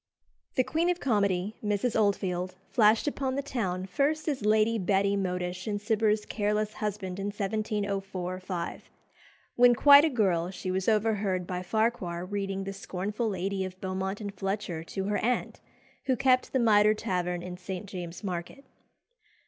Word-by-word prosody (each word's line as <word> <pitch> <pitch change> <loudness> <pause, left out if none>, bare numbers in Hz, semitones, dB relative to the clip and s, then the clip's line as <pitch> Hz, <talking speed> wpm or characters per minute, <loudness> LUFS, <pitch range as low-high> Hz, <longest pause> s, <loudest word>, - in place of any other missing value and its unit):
The 255 - +4
queen 330 +6 0
of 355 0 0
comedy, 200 -4 0
Mrs. 210 +3 0
Oldfield, 185 -4 0 0.2
flashed 220 +3 +4
upon 270 -2 -1
the 280 - -1
town 190 -9 -2
first 290 - 0
as 280 -8 -1
Lady 215 +1 +3
Betty 200 +1 +2
Modish 180 0 -2
in 205 -1 -1
Cibber's 215 0 +1
"Careless 210 0 -1
Husband," 200 -3 -4
in 195 - -2
1704 200 -3 -2
5. 185 -2 -5 0.7
When 245 0 +7
quite 285 +4 +8
a 320 - +3
girl 185 - +1
she 185 0 -4
was 190 +3 0
overheard 210 -4 +1
by 180 0 -3
Farquhar 185 -4 -1
reading 195 0 -3
"The 195 0 -5
Scornful 200 +4 -3
Lady" 195 0 -2
of 185 0 -7
Beaumont 190 +1 -3
and 205 -2 -5
Fletcher 195 -3 -3
to 195 +3 -4
her 205 +1 0
aunt, 245 +2 -1 0.5
who 260 - +3
kept 255 -1 +2
the - - +1
Mitre 215 -3 +5
Tavern 180 -4 -2
in 180 0 -6
St. 185 +1 -6
James's 180 -3 -7
Market. 180 +8 -5
200 Hz, 155 wpm, -28 LUFS, 185-220 Hz, 0.7 s, quite